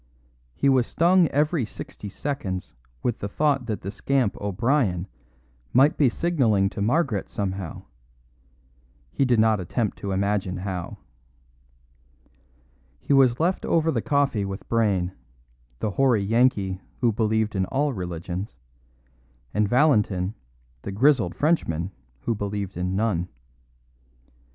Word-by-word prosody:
He - - +1
was 130 -3 +4
stung 175 +1 +4
every 150 +1 +1
sixty 105 -1 -8
seconds 100 -6 -4 0.3
with 120 - -1
the 100 - -3
thought 140 +1 +1
that 110 -3 -3
the 100 - -5
scamp 130 0 0
O'Brien 100 -2 0 0.7
might 140 +5 +5
be 140 -4 +4
signalling 115 - +1
to 110 - -5
Margaret 120 - +1
somehow; 95 -4 -4 1.3
he 135 - +1
did 120 -3 +3
not 110 -1 +4
attempt 105 +4 -2
to 100 - -4
imagine 95 -1 0
how. 90 -2 -5 2.0
He - - 0
was 130 -3 +4
left 175 +4 +1
over 165 -1 +2
the - - 0
coffee 140 -8 +1
with 95 0 -6
Brayne, 100 -6 +1 0.7
the 105 - -2
hoary 120 -2 +2
Yankee 100 -4 +2 0.2
who 120 -2 +4
believed 110 0 0
in 95 -1 +1
all 140 +1 0
religions, 90 0 -5 1.0
and 105 -1 +1
Valentin, 105 -8 +2 0.5
the 100 - -5
grizzled 115 -3 +3
Frenchman 95 - 0 0.3
who 115 - 0
believed 100 -2 -4
in 90 +2 -2
none. 100 -5 0
110 Hz, 125 wpm, -25 LUFS, 95-135 Hz, 2.0 s, might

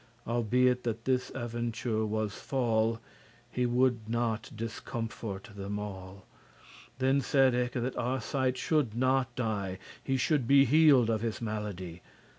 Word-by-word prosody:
Albeit 125 +2 +2
that 115 -1 -3
this 130 -1 +1
aventure 120 -2 -2
was 110 -1 -1
fall*, 115 -4 +1
*befallen 115 - -9 0.5
He 125 0 0
woulde 125 0 +2
not 115 -1 -1
discomforte* 110 -2 -5
them 100 0 -4
all 95 -2 -7 0.6
*discourage - - -27
Then 135 +2 +2
said 135 -1 +3
eke, 125 0 0
that 125 +1 -2
Arcite 130 +1 -1
should 140 -7 +1
not 130 0 +1
die, 105 -6 -2 0.3
He 135 -1 0
should 130 -1 +1
be 140 +1 +7
healed 140 -4 +5
of 110 -1 0
his 115 -2 -2
malady. 100 -6 -5
120 Hz, 140 wpm, -30 LUFS, 110-130 Hz, 0.6 s, be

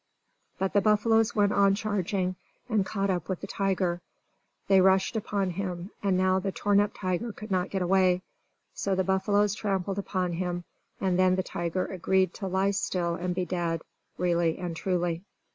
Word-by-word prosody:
But 190 0 -1
the 200 - +4
buffaloes 220 +2 +3
went 205 -1 +3
on 195 -1 +4
charging, 195 -3 -1 0.3
and 220 -5 +2
caught 195 0 -1
up 175 -3 -3
with 185 - -2
the - - -4
tiger. 190 -3 -1 0.7
They 190 -1 +6
rushed 190 +4 +3
upon 200 -3 -1
him, 180 +1 -4
and 195 -2 +2
now 185 0 +3
the 195 +1 -2
torn 205 +2 +2
up 205 0 +3
tiger 185 +5 -2
could 215 0 -10
not 185 -1 +1
get 190 -2 -1
away. 185 0 +3 0.5
So 195 -1 -1
the 190 - +1
buffaloes 200 +2 +2
trampled 195 -2 -2
upon 185 -3 -1
him, 175 0 -2 0.4
and 185 -2 +1
then 185 0 +4
the 185 - 0
tiger 175 +1 -2
agreed 185 0 +1
to 195 - -5
lie 190 +2 +1
still 180 -3 -1
and 175 +1 -2
be 185 -1 -1
dead, 170 -2 -2 0.3
really 170 -2 +1
and 175 -2 -4
truly. 175 -1 -1
190 Hz, 180 wpm, -28 LUFS, 180-200 Hz, 0.7 s, They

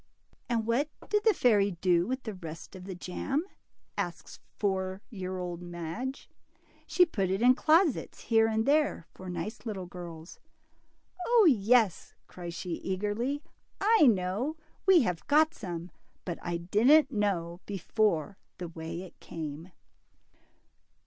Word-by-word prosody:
And 230 -2 0
what 250 +7 +1 0.2
did 420 0 +1
the 440 - +6
fairy 205 -5 +3
do 175 -2 +3
with 260 +1 -3
the 220 - -4
rest 165 -1 -9
of 185 -1 -9
the 190 -1 -6
jam?" 270 - -2 0.5
asks - - -5 0.2
four 190 -1 -1
year 185 -3 -4
old 175 -1 -4
Madge. 175 +10 -5 0.6
She 360 - +5
put 195 - -1
it 195 +4 0
in 250 +1 +8
closets, 315 +2 +2
here 225 -1 +3
and 220 0 0
there, 290 - +2
for 185 0 -9
nice 180 +6 -5
little 205 -5 -4
girls." 170 -2 -9 1.1
0 300 -7 +7
yes," 215 -2 +2
cries 175 -1 -8
she 175 -1 -4
eagerly, 210 +9 -2 0.4
I 420 -7 +5
know; 210 - -1 0.3
we 370 -4 +7
have 180 -6 -3
got 310 +2 +4
some, 175 - -6 0.3
but 175 -3 -4
I 175 0 -2
didn't 230 - +4
know 185 -6 -1
before 200 -2 0 0.2
the 175 -2 -5
way 165 +2 -6
it 185 - -13
came." 160 +2 -7
195 Hz, 140 wpm, -30 LUFS, 175-250 Hz, 1.1 s, in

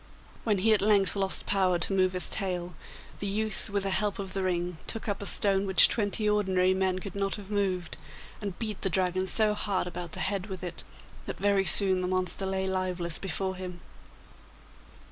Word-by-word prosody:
When 210 -3 +1
he 220 +4 +3
at 210 - +2
length 200 -2 +3
lost 195 -1 -1
power 185 -3 +1
to 170 +3 -1
move 185 -1 +1
his 185 - 0
tail, 180 -3 -2 0.5
the 200 - -3
youth 215 +1 0
with 200 -1 -2
the 195 - -2
help 205 +1 -1
of 195 -2 -6
the 195 - -2
ring 175 -2 -2
took 225 - -3
up 205 -1 -3
a 200 - +1
stone 195 -1 +1
which 190 -3 +8
twenty 210 -1 -2
ordinary 190 -3 +1
men 190 -1 -1
could 190 +1 -7
not 195 -1 -2
have 205 -1 -11
moved, 190 -4 -2 0.4
and 200 -4 -5
beat 215 -3 -5
the 195 - -1
Dragon 185 +1 -1
so 215 +2 +3
hard 200 -3 0
about 175 -2 -7
the - - -5
head 200 0 -2
with 190 -3 -8
it 175 -2 -7 0.4
that - - -6
very 200 0 +1
soon 190 -2 +8
the 180 - -2
monster 185 +1 -1
lay 190 0 -2
lifeless 185 -3 -1
before 190 0 -3
him. 180 -1 -8
190 Hz, 200 wpm, -28 LUFS, 185-200 Hz, 0.5 s, which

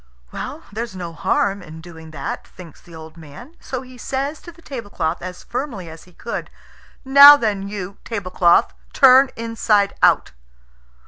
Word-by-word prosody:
"There's 225 0 -6
no 175 -2 -7
harm 195 +4 -1
in 160 -2 -11
doing 160 -1 -13
that," 140 -3 -6
thinks 170 -4 -14
the 170 - -15
old 160 0 -12
man; 165 - -13
so 260 -1 -6
he 255 -1 -15
says 275 +4 -4
to 345 - -11
the 335 0 -21
tablecloth 200 - -4
as 180 0 -8
firmly 230 - -6
as 160 - -13
he 180 - -21
could, 230 - -6 0.6
"Now 280 +2 +9
then 205 -6 -2
you, 200 -1 -7
tablecloth, 185 -5 +1 0.2
turn 265 0 +6
inside 225 -3 0
out!" - - +3
200 Hz, 150 wpm, -20 LUFS, 170-255 Hz, 0.6 s, Now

